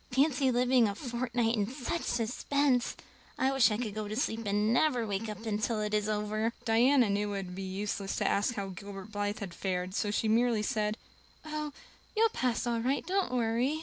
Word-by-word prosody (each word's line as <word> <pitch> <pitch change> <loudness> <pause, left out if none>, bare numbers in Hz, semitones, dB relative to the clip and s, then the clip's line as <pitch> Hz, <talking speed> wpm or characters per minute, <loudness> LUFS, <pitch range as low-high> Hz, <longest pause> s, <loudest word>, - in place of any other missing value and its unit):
Fancy 270 0 +3
living 250 -1 +4
a 200 - -3
fortnight 240 -2 -1
in 205 -2 0
such 265 +6 -3
suspense! 250 +2 0 0.4
I 265 +1 +2
wish 270 -3 +5
I 210 - -1
could 220 -3 -3
go 215 0 -4
to 210 - -4
sleep 230 -3 -1
and 210 +2 +2
never 245 -3 +2
wake 210 +1 -2
up 215 +2 -7
until 215 +1 0
it 210 0 -2
is 210 0 +1
over." 215 +2 -1
Diana 245 +3 +5
knew 205 +1 0
it - - -2
would 180 - -8
be 195 - -5
useless 195 +1 -3
to - - 0
ask 210 +4 +1
how 195 -1 -3
Gilbert 195 +2 -8
Blythe 205 0 -2
had 190 -4 -5
fared, 185 0 -2
so 205 - 0
she 210 +2 0
merely 230 0 +3
said: 210 0 0 0.5
"Oh, 305 -1 -3 0.5
you'll 450 +1 +5
pass 250 - -1
all 235 -1 0
right. 260 +5 0
Don't 380 -4 0
worry." 245 +5 +1
225 Hz, 200 wpm, -31 LUFS, 205-250 Hz, 0.5 s, wish